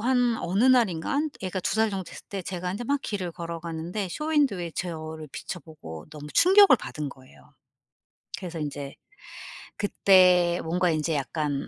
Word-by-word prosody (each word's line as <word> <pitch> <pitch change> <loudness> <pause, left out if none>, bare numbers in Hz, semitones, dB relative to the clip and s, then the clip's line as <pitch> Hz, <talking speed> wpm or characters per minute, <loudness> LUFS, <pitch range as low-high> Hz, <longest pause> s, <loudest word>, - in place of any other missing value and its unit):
한 245 -2 +2
어느 195 +7 +1
날인가는 255 - +2
애가 185 0 -3
2 - - -1
살 220 -1 +2
정도 190 -2 -3
됐을 - - -11
때 195 -2 -4
제가 180 0 -4
인제 235 +5 -5
막 285 +3 0
길을 185 -5 -3
걸어가는데 170 +3 -5
쇼윈도에 280 - 0
제 180 -1 -2
얼굴을 155 -1 -7
비춰 180 - -6
보고 80 - -10
너무 150 -1 -9
충격을 385 -5 +7
받은 150 -8 -5
거예요. 135 +2 -16 0.8
그래서 175 -3 -6
인제 145 -2 -5 0.8
그때 180 -3 +4
뭔가 180 +2 +1
인제 155 0 0
약간 145 0 -2
180 Hz, 320 characters per minute, -26 LUFS, 160-210 Hz, 0.8 s, 충격을